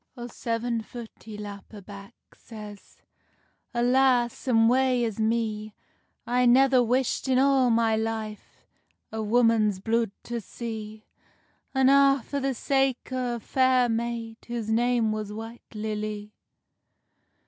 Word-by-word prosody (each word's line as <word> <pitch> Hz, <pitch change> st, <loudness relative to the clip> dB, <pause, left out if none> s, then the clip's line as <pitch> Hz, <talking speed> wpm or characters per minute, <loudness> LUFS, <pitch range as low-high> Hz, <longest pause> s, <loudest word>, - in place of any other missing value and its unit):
O 240 Hz, -, -6 dB
seven 230 Hz, -1 st, -2 dB
foot 230 Hz, +1 st, -9 dB
he 215 Hz, -2 st, -8 dB
lap 205 Hz, -1 st, -9 dB
a 215 Hz, -, -9 dB
back; 200 Hz, +3 st, -12 dB, 0.2 s
Says, 210 Hz, -3 st, -12 dB, 0.7 s
"Alas, 245 Hz, 0 st, +2 dB
and 225 Hz, -2 st, +4 dB
wae 255 Hz, 0 st, +3 dB
is 225 Hz, -2 st, -3 dB
me! 220 Hz, -1 st, -1 dB, 0.5 s
I 245 Hz, +1 st, +2 dB
never 260 Hz, +1 st, +5 dB
wisht 250 Hz, +3 st, 0 dB
in 260 Hz, -1 st, +3 dB
a' 270 Hz, -1 st, +4 dB
my 225 Hz, -1 st, +3 dB
life, 220 Hz, -1 st, -5 dB, 0.5 s
A 220 Hz, 0 st, -3 dB
woman's 220 Hz, -2 st, +3 dB
blude 230 Hz, +3 st, 0 dB
to 235 Hz, -1 st, -4 dB
see; 220 Hz, 0 st, -7 dB, 0.7 s
An 265 Hz, -1 st, +4 dB
ae 275 Hz, -2 st, +5 dB
for 285 Hz, -, -3 dB
the 270 Hz, -1 st, -1 dB
sake 270 Hz, 0 st, 0 dB
of 245 Hz, -3 st, -2 dB
ae -, -, -26 dB
fair 255 Hz, -2 st, +3 dB
maid 230 Hz, 0 st, -3 dB
Whose 235 Hz, -2 st, -3 dB
name 235 Hz, -1 st, +2 dB
was 215 Hz, -1 st, -4 dB
White 225 Hz, +2 st, -8 dB
Lilly." 210 Hz, -1 st, -4 dB
230 Hz, 135 wpm, -26 LUFS, 215-250 Hz, 0.7 s, never